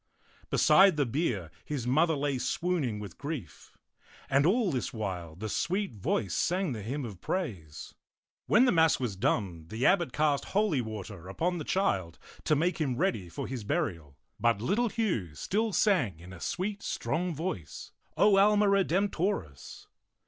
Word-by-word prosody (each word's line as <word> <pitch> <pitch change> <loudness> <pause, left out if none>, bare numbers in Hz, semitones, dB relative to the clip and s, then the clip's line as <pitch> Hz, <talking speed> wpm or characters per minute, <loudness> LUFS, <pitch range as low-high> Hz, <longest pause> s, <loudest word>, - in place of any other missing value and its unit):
Beside 190 -4 +5
the 145 - +2
bier 115 - -2
his 140 -6 -4
mother 155 +6 +3
lay 140 -2 -1
swooning 135 -4 -1
with 100 -5 -9
grief; 145 - -7 0.5
and 140 +3 +4
all 210 0 +2
this 125 -4 -2
while 90 -7 -5
the 110 +5 -5
sweet 190 - -1
voice 100 -1 -1
sang 180 -2 0
the 110 -4 -4
hymn 130 +6 -4
of 100 -6 -9
praise. 95 - -4 0.5
When 235 +5 +5
the 250 - +4
mass 160 -2 +4
was 120 -6 -2
done, 90 -4 -1
the 110 +7 -2
abbot 175 -3 +3
cast 150 -2 +1
holy 200 -9 +1
water 105 -5 -7
upon 175 - -1
the - - -4
child 95 - 0 0.3
to 155 - +3
make 170 +3 0
him 130 -5 0
ready 100 -9 0
for 80 - -5
his 125 -2 -5
burial, 95 - -2 0.2
but 115 -3 +2
little 210 - +1
Hugh 170 - -2
still 220 - -1
sang 145 - +2
in 90 +2 -11
a 90 - -10
sweet, 200 - -3
strong 175 0 -2
voice, 135 - -5 0.3
O 200 -1 +5
Ahna 210 +1 +5
Redempioris. 190 - 0
140 Hz, 160 wpm, -29 LUFS, -, 0.5 s, Beside